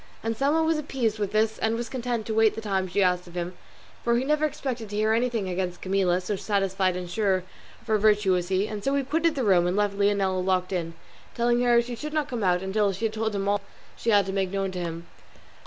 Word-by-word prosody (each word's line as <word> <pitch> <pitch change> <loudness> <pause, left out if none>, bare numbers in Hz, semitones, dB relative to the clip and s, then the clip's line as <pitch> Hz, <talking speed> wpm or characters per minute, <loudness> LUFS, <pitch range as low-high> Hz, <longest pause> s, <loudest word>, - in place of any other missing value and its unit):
Anselmo 275 +8 +1
was 320 -1 +1
appeased 245 -7 -1
with 205 -2 -1
this, 215 +1 +1
and 220 +1 +1
was 235 +1 -3
content 240 -2 -3
to 220 - -3
wait 220 -1 +4
the 225 - -5
time 195 -3 -1
she 195 +2 +1
asked 180 -1 +1
of 175 - -13
him, 175 +1 -3 0.5
for 235 0 +2
he 255 - 0
never 300 +1 +2
expected 255 -6 -4
to 205 - -5
hear 215 +1 +2
anything 230 -3 0
against 180 -1 -3
Camilla, 185 -2 +2
so 185 +3 -3
satisfied 195 -2 0
and 180 -1 -5
sure 190 -1 0 0.4
of - - -23
her 215 -1 +2
virtue 210 -2 +3
was 180 -1 +1
he; 190 +2 +1
and 210 -2 -6
so 275 +1 +1
he 280 - +1
quitted 320 +4 +1
the 265 - -1
room, 180 -5 +4
and 180 +3 0
left 205 -1 +1
Leonela 195 -2 +2
locked 185 0 0
in, 165 -2 -3 0.4
telling 240 +1 +2
her 240 -1 +5
she 240 0 -6
should 300 +5 -6
not 305 -2 0
come 240 -4 -3
out 180 -1 +2
until 200 +1 +1
she 195 +4 -3
had 220 - -1
told 220 -1 -2
him 200 0 -1
all 205 0 +1 0.3
she 230 - -3
had 205 -3 +5
to 190 - -4
make 195 -1 0
known 195 0 -2
to 185 - -5
him. 170 -1 -5
205 Hz, 250 wpm, -26 LUFS, 190-235 Hz, 0.5 s, her